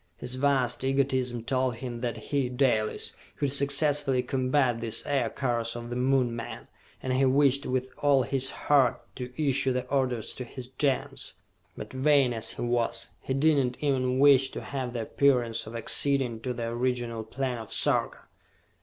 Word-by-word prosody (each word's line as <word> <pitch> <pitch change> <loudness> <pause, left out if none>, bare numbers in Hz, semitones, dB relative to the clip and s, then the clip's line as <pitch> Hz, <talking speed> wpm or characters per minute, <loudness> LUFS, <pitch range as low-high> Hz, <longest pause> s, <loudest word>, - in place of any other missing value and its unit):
His 125 - -6
vast 130 -2 +1
egotism 130 -3 0
told 130 0 0
him 120 0 -6
that 120 -1 -3
he, 140 -3 -2
Dalis, 125 -4 0 0.2
could 140 -2 -1
successfully 140 -2 +2
combat 130 -1 0
these 115 -2 -1
Aircars 120 -3 -1
of 120 0 -7
the - - -3
Moon 125 -1 +1
men, 115 - -7 0.4
and 130 - -1
he 130 +1 +2
wished 140 +1 +3
with 130 0 -2
all 140 -2 +3
his 135 +2 0
heart 135 -5 +2 0.2
to 125 -1 -6
issue 135 -3 +1
the 125 0 -2
orders 130 -5 -1
to 125 - -6
his 125 +1 -10
Gens. 135 -3 -1 0.4
But, - - -8
vain 135 -1 +3
as 115 -1 0
he - - -5
was, 120 -1 0
he 130 - -3
did 145 0 +3
not 125 0 -3
even 130 -3 0
wish 135 -1 +5
to - - -5
have 130 -3 -5
the 115 -2 -3
appearance 120 -3 +1
of 115 - -8
acceding 125 0 +2
to 125 +2 -3
the 115 - -3
original 120 -1 -2
plan 125 +2 -3
of 110 - -9
Sarka! - - +1
130 Hz, 170 wpm, -27 LUFS, 120-135 Hz, 0.4 s, wish